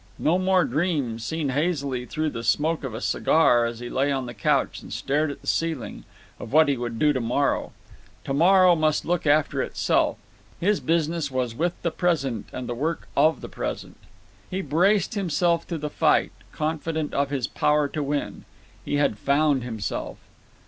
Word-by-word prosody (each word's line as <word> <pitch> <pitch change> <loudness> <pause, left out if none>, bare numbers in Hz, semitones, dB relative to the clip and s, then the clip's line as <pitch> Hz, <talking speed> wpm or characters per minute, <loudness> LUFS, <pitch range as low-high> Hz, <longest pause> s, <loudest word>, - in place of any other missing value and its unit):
No 170 +4 +2
more 185 -1 +3
dreams, 140 -6 -1
seen 160 +2 -2
hazily 140 -4 -1
through 155 -1 -2
the 115 - -6
smoke 150 +8 +1
of 125 -5 -5
a - - -6
cigar, 120 -7 +3
as 115 0 -7
he 120 - -5
lay 135 +3 0
on 135 -2 -1
the 120 - -7
couch 100 - 0
and - - -12
stared 150 +3 0
at 140 - -7
the - - -17
ceiling, 165 -7 -2 0.3
of 110 - -8
what 155 +2 +5
he 140 - +2
would 120 -2 -4
do 150 +4 +3
to 130 - -1
morrow. 125 +5 0 0.5
To 135 - -3
morrow 180 +4 +5
must 155 -1 +1
look 175 -2 -1
after 145 +1 +2
itself. - - 0 0.4
His 205 +4 +2
business 165 -2 0
was 130 -3 -2
with 170 +8 -2
the 170 - 0
present 140 - -1
and 130 -1 -6
the 120 - -2
work 155 +7 -3
of 155 +3 +3
the - - -6
present. - - -5 0.5
He 190 +1 -2
braced 190 - +2
himself 175 -3 0
to 170 - -3
the 150 0 -4
fight, - - +2 0.2
confident 155 0 -2
of 140 0 0
his 140 -3 -1
power 150 -1 +1
to 155 - -3
win. 145 0 -3 0.4
He - - -2
had 145 -7 +1
found 140 0 +2
himself. 110 -5 -4
150 Hz, 185 wpm, -24 LUFS, 130-165 Hz, 0.5 s, what